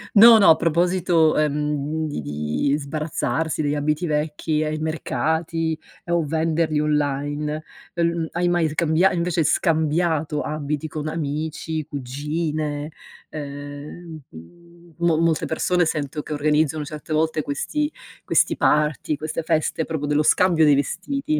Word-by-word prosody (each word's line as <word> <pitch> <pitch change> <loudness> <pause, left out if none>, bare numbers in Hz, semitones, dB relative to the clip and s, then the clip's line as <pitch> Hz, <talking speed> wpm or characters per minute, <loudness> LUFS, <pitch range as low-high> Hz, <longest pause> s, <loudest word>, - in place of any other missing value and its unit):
No, 225 +2 +10
no, 195 - +6
a 160 - +8
proposito, 170 -1 +2
ehm, 150 +1 -1
di 145 - -4
di 75 - -1
sbarazzarsi 155 0 -2
degli 145 0 0
abiti 150 +4 0
vecchi 150 0 -1
ai 155 0 -2
mercati, 160 +1 -1 0.2
ehm, 170 - -3
o 170 -2 +1
venderli 160 0 0
online, 150 +1 -1 0.3
uhm, 170 -1 0
l 160 - -3
hai 175 +1 0
mai 175 -2 +2
scambia 160 +4 +2
invece 170 -1 0
scambiato 160 -1 +1
abiti 150 0 -3
con 155 0 -5
amici, 155 0 -3
cugine? 150 +2 -3 0.4
Ehm, 145 +3 -8
mhmm, 170 - -16
mo 170 -2 +2
molte 165 -1 +1
persone 175 +2 +1
sento 150 -1 -2
che - - -5
organizzano 150 +1 +1
certe 150 +1 -6
volte 155 0 +1
questi 295 - -2 0.3
questi - - +2
party, 150 0 +1
queste 155 +2 -4
feste 155 0 0
proprio 155 -3 -3
dello 150 +1 +2
scambio 170 0 +4
dei 145 -1 +6
vestiti. 170 - -1
155 Hz, 135 wpm, -22 LUFS, 150-165 Hz, 0.4 s, No